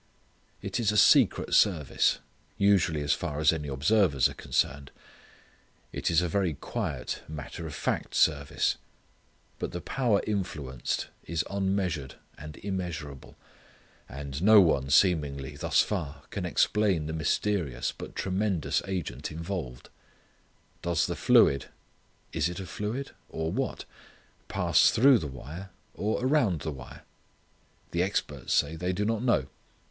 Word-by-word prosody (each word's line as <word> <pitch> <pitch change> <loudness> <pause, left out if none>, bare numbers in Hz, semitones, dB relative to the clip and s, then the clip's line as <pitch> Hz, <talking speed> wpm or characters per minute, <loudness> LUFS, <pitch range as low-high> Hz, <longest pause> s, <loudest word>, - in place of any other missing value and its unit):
It - - -2
is 110 -3 +2
a 105 - 0
secret - - +5
service, 80 -9 +3 0.4
usually 90 -6 +3
as 70 - +2
far 75 -4 -3
as 75 +1 +4
any 75 -2 -4
observers 70 - +3
are - - -8
concerned. 70 0 -1 1.0
It - - -1
is 85 +1 +3
a - - 0
very 90 -2 0
quiet, - - -4
matter 80 +2 -7
of 75 - -7
fact - - -2
service. 75 -1 +2 0.8
But - - -4
the 90 - -3
power 115 +1 +1
influenced 75 - -3 0.2
is 85 +1 -2
unmeasured 95 -7 -1 0.2
and 75 +1 -10
immeasurable. 85 -8 -5 0.7
And 70 +1 -6
no 105 +2 +8
one, 70 -7 +3
seemingly, 70 -4 +2
thus - - +2
far, 85 -9 -4
can - - -3
explain 100 -7 +2
the 80 - -4
mysterious 80 -2 -1
but - - -9
tremendous 95 -3 0
agent 80 -8 -4
involved. 80 -6 -5 0.9
Does 85 -1 +1
the - - -3
fluid 70 - +4 0.7
it 85 +4 -1
a 95 - -5
fluid? 110 +8 -4 0.2
or, 80 0 -3
what? - - -3 0.6
pass - - +4
through 130 +1 +5
the 75 - -4
wire? 75 +8 -9 0.2
or, 110 +4 -1
around 125 - +2
the 80 - -3
wire? 65 -4 -11 0.9
The 85 - 0
experts 95 +2 -2
say 75 +3 +2
they 90 +3 -2
do 105 +3 -1
not 115 0 0
know. 120 - +2
85 Hz, 135 wpm, -28 LUFS, 75-100 Hz, 1.0 s, no